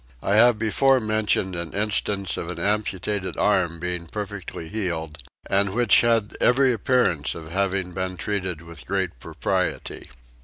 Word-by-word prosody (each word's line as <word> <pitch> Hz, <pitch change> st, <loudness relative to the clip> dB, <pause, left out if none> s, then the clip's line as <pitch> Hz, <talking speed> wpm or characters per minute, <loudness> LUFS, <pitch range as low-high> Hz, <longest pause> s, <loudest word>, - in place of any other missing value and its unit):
I 100 Hz, -, +1 dB
have 115 Hz, +1 st, +6 dB
before 130 Hz, +5 st, +3 dB
mentioned 110 Hz, -4 st, 0 dB
an 85 Hz, -1 st, -5 dB
instance 100 Hz, -2 st, +1 dB
of 85 Hz, -, -5 dB
an 90 Hz, -, -5 dB
amputated 100 Hz, +1 st, -1 dB
arm 90 Hz, -5 st, +1 dB
being 90 Hz, 0 st, -4 dB
perfectly 100 Hz, -4 st, -6 dB
healed 80 Hz, -5 st, -4 dB, 0.3 s
and 100 Hz, 0 st, +1 dB
which 120 Hz, 0 st, +5 dB
had 115 Hz, -3 st, +1 dB
every 130 Hz, +1 st, +4 dB
appearance 100 Hz, -, +1 dB
of 80 Hz, -1 st, -9 dB
having 95 Hz, -1 st, -1 dB
been 95 Hz, 0 st, -4 dB
treated 95 Hz, -6 st, -3 dB
with 85 Hz, 0 st, -12 dB
great 95 Hz, -8 st, -2 dB
propriety. -, -, -3 dB
95 Hz, 145 wpm, -24 LUFS, 85-105 Hz, 0.3 s, have